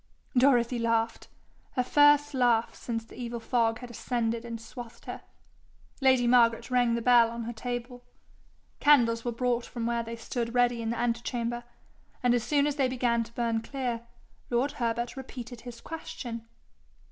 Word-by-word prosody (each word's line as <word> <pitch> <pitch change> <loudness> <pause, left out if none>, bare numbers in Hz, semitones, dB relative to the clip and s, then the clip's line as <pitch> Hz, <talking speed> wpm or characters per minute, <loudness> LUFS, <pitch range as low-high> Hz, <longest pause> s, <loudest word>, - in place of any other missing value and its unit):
Dorothy 245 -2 +4
laughed 230 0 0 0.5
her 250 - +1
first 290 +2 +5
laugh 240 -3 +2
since 230 -2 -4
the - - -14
evil 235 -1 -4
fog 225 -1 +1
had 245 -1 -8
ascended 235 -1 -2
and 230 -1 -6
swathed 230 +1 -10
her. - - -6 0.8
Lady 260 -2 +4
Margaret 235 -1 +4
rang 245 -2 +3
the 235 - -2
bell 240 -2 +6
on 235 0 -5
her 235 +1 -5
table. 245 +1 -5 0.8
Candles 235 -6 +4
were 240 - -1
brought 240 0 -1
from 235 -2 -4
where 235 0 0
they 230 0 -6
stood 235 +1 -4
ready 245 -1 +3
in 225 - -2
the 235 - -2
ante 235 -1 0
chamber, 240 -1 -3 0.6
and 245 -1 +4
as 240 -2 +1
soon 285 +4 +2
as 295 0 -1
they 270 -2 +3
began 240 -2 +1
to 230 - -14
burn 230 -1 0
clear, 245 -2 -3 0.5
lord 250 +4 +1
Herbert 235 0 -2
repeated 250 -3 -8
his 240 -1 -9
question. 235 -7 -7
240 Hz, 170 wpm, -28 LUFS, 230-250 Hz, 0.8 s, bell